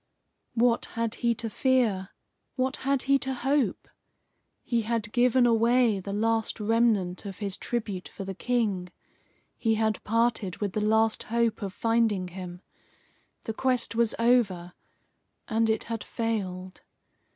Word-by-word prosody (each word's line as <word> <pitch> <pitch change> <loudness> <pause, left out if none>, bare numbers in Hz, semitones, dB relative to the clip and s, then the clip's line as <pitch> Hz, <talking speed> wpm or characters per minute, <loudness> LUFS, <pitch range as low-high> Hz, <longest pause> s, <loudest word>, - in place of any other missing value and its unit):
What 235 0 +3
had 230 -1 0
he 235 -1 +2
to 225 - -4
fear? 225 -6 +1 0.5
What 260 +2 -1
had 275 0 0
he 275 0 +3
to 265 0 -2
hope? 265 -4 0 0.8
He 235 -2 0
had 225 -1 -2
given 250 +1 +4
away 230 -1 +3
the 200 +1 -6
last 225 +2 0
remnant 215 -4 +1
of 195 - -7
his 200 -3 -2
tribute 210 -6 -3
for 195 - -8
the 195 0 -5
King. 205 -4 -1 0.7
He 225 -2 +1
had 220 -1 0
parted 225 -4 0
with 200 -3 -3
the 215 - -1
last 220 +1 +2
hope 230 -1 +1
of 200 -2 -3
finding 225 -3 +1
him. 180 0 -8 0.8
The 225 - -4
quest 250 0 +1
was 230 -1 +1
over, 210 -8 +2 0.7
and 225 -1 +1
it 220 -1 +1
had 230 -2 -4
failed. 190 -5 -4
225 Hz, 140 wpm, -27 LUFS, 200-235 Hz, 0.8 s, given